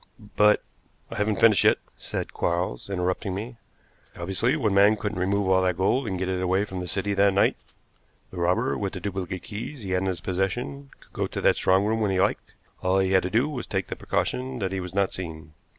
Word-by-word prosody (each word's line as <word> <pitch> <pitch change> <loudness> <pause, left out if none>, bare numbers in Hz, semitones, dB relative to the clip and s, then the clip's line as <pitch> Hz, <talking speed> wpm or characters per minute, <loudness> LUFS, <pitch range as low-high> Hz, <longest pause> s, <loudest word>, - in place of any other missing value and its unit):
"But 105 0 +5 0.2
" - - -34
"I 115 - -5
haven't 105 0 0
finished 110 -4 +6
yet," - - +5 0.2
said - - -5
Quarles, 85 -4 -2
interrupting 90 0 -1
me. 115 +4 -6 0.6
"Obviously 95 +8 +1
one 105 -3 +1
man 100 +2 +6
couldn't 105 -2 -4
remove 100 +2 +1
all 95 0 +4
that 90 -1 +1
gold 115 +7 +1
and 95 -3 -2
get 95 0 -2
it 95 -1 -1
away 95 +2 +1
from 95 -3 -6
the 90 - -5
city 100 +2 0
that 100 0 +3
night. 100 - +4 0.8
The 95 - -9
robber, 90 +9 +1
with 100 -2 -2
the - - -5
duplicate 95 -1 -4
keys 115 +4 -7
he 95 - -5
had 90 0 +1
in 95 - -1
his 90 -3 -1
possession, 95 +10 -3
could - - -20
go - - -1
to - - -5
that - - +4
strong 95 +2 +3
room 110 +1 0
when 105 - +2
he 95 -1 +1
liked; 95 - 0 0.3
all 95 +1 +2
he 95 -1 +2
had 95 -1 +5
to 90 - -3
do 115 +8 +2
was 135 -6 -5
to 95 - -2
take 95 - -2
the - - -3
precaution 130 0 -2
that 95 -4 -2
he 95 - -2
was 90 0 -7
not 100 -1 +1
seen. 80 -4 -7
95 Hz, 235 wpm, -26 LUFS, 95-105 Hz, 0.8 s, finished